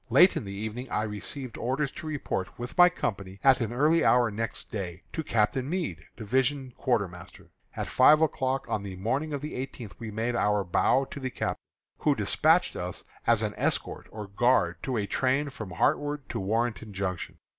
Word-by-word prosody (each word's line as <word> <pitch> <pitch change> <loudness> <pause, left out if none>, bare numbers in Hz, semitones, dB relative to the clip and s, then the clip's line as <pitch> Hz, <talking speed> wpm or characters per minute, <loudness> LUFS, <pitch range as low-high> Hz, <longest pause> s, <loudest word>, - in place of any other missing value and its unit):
Late 180 +2 +6
in - - -3
the 100 - -6
evening 110 +5 -5
I 105 - 0
received 110 +4 -5
orders 135 +4 -1
to 160 - -8
report, 140 -11 -3
with 120 +1 -6
my 175 0 +8
company, 100 - -4
at 135 -2 +6
an 115 -1 -1
early 150 +7 +3
hour 120 -2 +4
next 115 +2 -4
day, 90 -4 -5
to 160 - -2
Captain 125 +2 +1
Meade, 155 - -3
division 130 +3 0
quartermaster. 95 -9 -3 0.2
At - - -2
five 155 - +6
o'clock 135 -4 0
on 105 - -1
the 100 -2 -6
morning 130 +11 -1
of 145 -2 -3
the 150 - -5
eighteenth 125 -5 -6
we 115 -2 -5
made 115 +3 -2
our 105 -3 +2
bow 125 +9 +2
to 140 - -8
the 130 -1 -3
captain, - - -3 0.4
who - - +3
despatched - - +3
us - - -4 0.2
as - - +4
an - - -1
escort - - -1
or 105 -1 -7
guard 100 -4 +2
to 130 -3 -2
a 105 - 0
train 135 +6 0
from 110 -6 -7
Hartwood 145 - 0
to - - -3
Warrenton 110 +1 -1
Junction. 95 -2 -3
120 Hz, 190 wpm, -28 LUFS, 100-135 Hz, 0.4 s, my